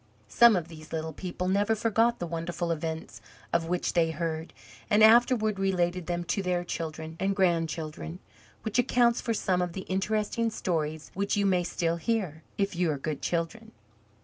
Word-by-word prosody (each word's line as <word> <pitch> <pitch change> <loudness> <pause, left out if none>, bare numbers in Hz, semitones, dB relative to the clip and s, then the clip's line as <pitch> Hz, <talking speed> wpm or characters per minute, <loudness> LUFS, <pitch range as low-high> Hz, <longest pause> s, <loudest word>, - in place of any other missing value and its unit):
Some 235 -2 +7
of 170 -3 -1
these 155 -1 -12
little 160 0 -3
people 180 +2 -4
never 205 +3 +2
forgot 230 +2 +2
the 175 - -3
wonderful 170 +1 -3
events 160 -7 -4 0.3
of 170 -1 +1
which 180 +1 -1
they 165 -2 +3
heard, 160 0 -3 0.4
and 210 +1 +5
afterward 220 -2 +5
related 180 -2 0
them 175 0 -1
to 175 +3 -1
their 180 -2 0
children 160 -1 -5
and 195 +1 0
grandchildren, 165 -3 -1 0.5
which 220 +2 0
accounts 240 -1 +3
for 230 -2 -1
some 185 -3 +1
of 175 -1 -2
the 190 - -4
interesting 215 +4 -1
stories 160 -7 -2
which 200 +2 -1
you 200 - +2
may 185 -2 +3
still 170 -1 -1
hear, 175 -4 -1 0.2
if 200 -2 0
you 175 -1 +1
are 150 - 0
good 145 +1 -4
children. 220 +7 -3
180 Hz, 175 wpm, -28 LUFS, 165-205 Hz, 0.5 s, Some